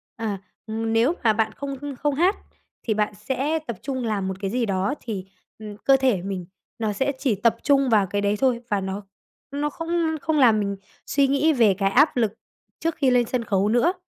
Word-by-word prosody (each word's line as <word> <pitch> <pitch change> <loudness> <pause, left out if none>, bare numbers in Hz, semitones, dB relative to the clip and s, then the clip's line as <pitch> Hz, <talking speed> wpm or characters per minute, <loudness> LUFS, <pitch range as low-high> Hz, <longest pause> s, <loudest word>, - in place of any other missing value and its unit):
à, 215 -3 -3 0.3
ừm. 225 +1 -2
Nếu 240 +9 +3
mà 220 -2 +5
bạn 220 0 0
không 275 -1 -5
h - - -7
không 290 -1 0
hát 360 +7 +3 0.5
thì 220 - 0
bạn 210 0 0
sẽ 270 +9 -1
tập 235 -5 -4
trung 260 -2 -3
làm 200 -3 -1
một 190 - -2
cái 195 -1 -2
gì 245 -1 0
đó 195 +6 0
thì, 200 -5 -5 0.3
ừm, 210 -1 -8
cơ 270 +3 +4
thể 255 -9 +2
mình 190 -2 -4 0.3
nó 215 -2 0
sẽ 265 +7 0
chỉ 250 -7 +1
tập 230 +3 +2
trung 275 -2 +3
vào 210 -4 +4
cái 205 +2 -1
đấy 205 +1 +1
thôi 250 -3 +2
và 205 -2 +1
nó 190 +2 -4 0.5
nó 290 +1 -1
không 330 0 -1
không 315 -2 +1
làm 230 -5 +5
mình 200 -1 -1 0.3
suy 280 -1 +2
nghĩ 295 +3 +3
về 225 -6 +4
cái 195 -1 +2
áp 285 +2 +4
lực 220 -3 +1 0.5
trước 330 -1 -1
khi 270 -3 +2
lên 245 -1 +3
sân 245 0 -2
khấu 200 -1 +1
nữa, 245 +11 +3
230 Hz, 220 wpm, -24 LUFS, 205-275 Hz, 0.5 s, mà